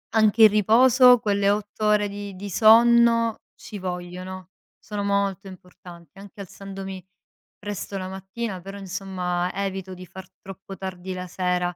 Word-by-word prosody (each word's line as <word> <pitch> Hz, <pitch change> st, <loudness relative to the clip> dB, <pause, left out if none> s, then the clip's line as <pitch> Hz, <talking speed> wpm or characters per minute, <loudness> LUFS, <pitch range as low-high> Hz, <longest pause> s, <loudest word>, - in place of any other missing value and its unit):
anche 220 Hz, 0 st, +4 dB
il 215 Hz, -, +10 dB
riposo, 245 Hz, +4 st, +6 dB
quelle 200 Hz, -2 st, +1 dB
8 210 Hz, +1 st, -2 dB
ore 210 Hz, -1 st, +3 dB
di 200 Hz, -1 st, -8 dB
di 200 Hz, +2 st, -7 dB
sonno 230 Hz, +1 st, +5 dB, 0.2 s
ci 205 Hz, -, -10 dB
vogliono, 180 Hz, 0 st, -7 dB, 0.3 s
sono 205 Hz, -1 st, -6 dB
molto 200 Hz, -1 st, -1 dB
importanti. 180 Hz, -2 st, -14 dB
Anche 200 Hz, +1 st, -14 dB
alzandomi 195 Hz, -1 st, -8 dB, 0.5 s
presto 205 Hz, -1 st, -6 dB
la 185 Hz, -1 st, -5 dB
mattina, 190 Hz, +1 st, -6 dB
però 195 Hz, +2 st, -9 dB
insomma, 185 Hz, -2 st, -3 dB
evito 190 Hz, -1 st, -4 dB
di 185 Hz, 0 st, -11 dB
far 190 Hz, 0 st, -11 dB
troppo 195 Hz, 0 st, -11 dB
tardi 190 Hz, -1 st, -6 dB
la 180 Hz, 0 st, -6 dB
sera 180 Hz, -1 st, -1 dB
195 Hz, 145 wpm, -24 LUFS, 185-210 Hz, 0.5 s, il